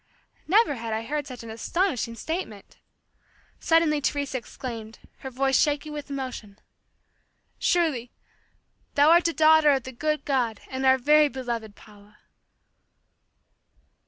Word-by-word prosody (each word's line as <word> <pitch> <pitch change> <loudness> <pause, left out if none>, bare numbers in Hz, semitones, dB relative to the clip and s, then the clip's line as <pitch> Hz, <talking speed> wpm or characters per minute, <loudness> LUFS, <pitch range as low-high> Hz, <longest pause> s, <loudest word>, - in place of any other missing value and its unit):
Never 415 0 +4
had 225 -1 -4
I 220 +1 -2
heard 290 +4 -3
such 250 -3 -9
an 225 - -8
astonishing 240 - -1
statement. 230 - -6 0.8
Suddenly 325 -3 +2
Teresa 280 -2 -1
exclaimed, 230 -2 -8 0.2
her 265 - -7
voice 270 +1 +1
shaking 295 0 -1
with 295 -1 -7
emotion, 255 -7 -6 1.0
"Surely, 305 -9 +1 0.9
thou 290 +2 +5
art 340 +1 +5
a 335 - -1
daughter 315 -1 +5
of 270 -3 +2
the 260 - -8
good 305 +5 -2
God 245 -6 0
and 265 0 -1
our 260 0 +6
very 300 +3 +4
beloved 235 -6 -5
Paula!" 210 0 -18
270 Hz, 130 wpm, -25 LUFS, 230-300 Hz, 1.0 s, our